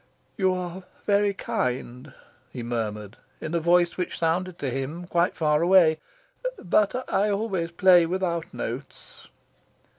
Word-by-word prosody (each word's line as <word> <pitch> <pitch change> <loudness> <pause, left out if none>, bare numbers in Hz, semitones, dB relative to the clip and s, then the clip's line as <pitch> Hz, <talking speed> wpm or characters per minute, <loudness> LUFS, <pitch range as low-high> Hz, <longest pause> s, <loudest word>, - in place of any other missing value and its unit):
"You 190 -3 +2
are 180 0 -5 0.2
very 205 0 +3
kind," 125 -6 -3 0.4
he 125 - -6
murmured, 110 -3 -4 0.2
in 155 - -5
a 170 - +2
voice 175 +1 +3
which 180 - -3
sounded 175 +2 -1
to 135 -3 -3
him 135 +7 -4
quite 175 0 +1
far 150 -1 +2
away. 170 -3 +5 0.6
"But 215 +8 +1
I 205 +2 +1
always 200 -5 -1
play 175 -1 +5
without 170 -2 -2
notes." 125 +5 -7
170 Hz, 130 wpm, -25 LUFS, 145-185 Hz, 0.6 s, away